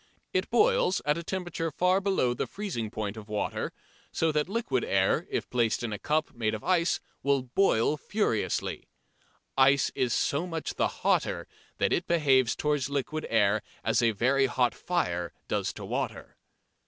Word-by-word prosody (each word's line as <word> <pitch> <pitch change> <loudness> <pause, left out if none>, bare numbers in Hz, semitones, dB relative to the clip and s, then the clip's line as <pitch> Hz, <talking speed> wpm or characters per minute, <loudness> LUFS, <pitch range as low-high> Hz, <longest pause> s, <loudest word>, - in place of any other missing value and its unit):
It - - 0
boils 470 - +3
at 150 +2 +2
a - - -6
temperature 175 -2 -3
far 180 +5 +2
below 190 -11 +1
the 120 - -3
freezing 180 - -4
point 105 0 -4
of 110 0 -10
water, 105 -1 -2 0.4
so 160 -1 +1
that 150 +3 0
liquid 195 - -1
air - - +1
if - - -2
placed 120 -2 +1
in 115 -3 -2
a 105 - -5
cup 155 +5 0
made 110 -3 -1
of 110 - -8
ice 175 -2 +2 0.2
will 140 -2 +2
boil 130 -1 +2
furiously. 205 - -1 0.7
Ice 135 +1 +4
is 125 -2 0
so 145 +9 0
much 165 -2 -4
the - - +1 0.2
hotter - - +1 0.3
that - - +2
it 175 - 0
behaves 135 -7 +3
towards 145 -3 0
liquid 145 +2 -2
air 105 -1 +3 0.2
as - - +2
a 120 - +4
very 130 +5 +2
hot 125 0 +1
fire 90 - -2
does - - -1
to - - -8
water. - - -4
140 Hz, 165 wpm, -28 LUFS, 115-170 Hz, 0.7 s, Ice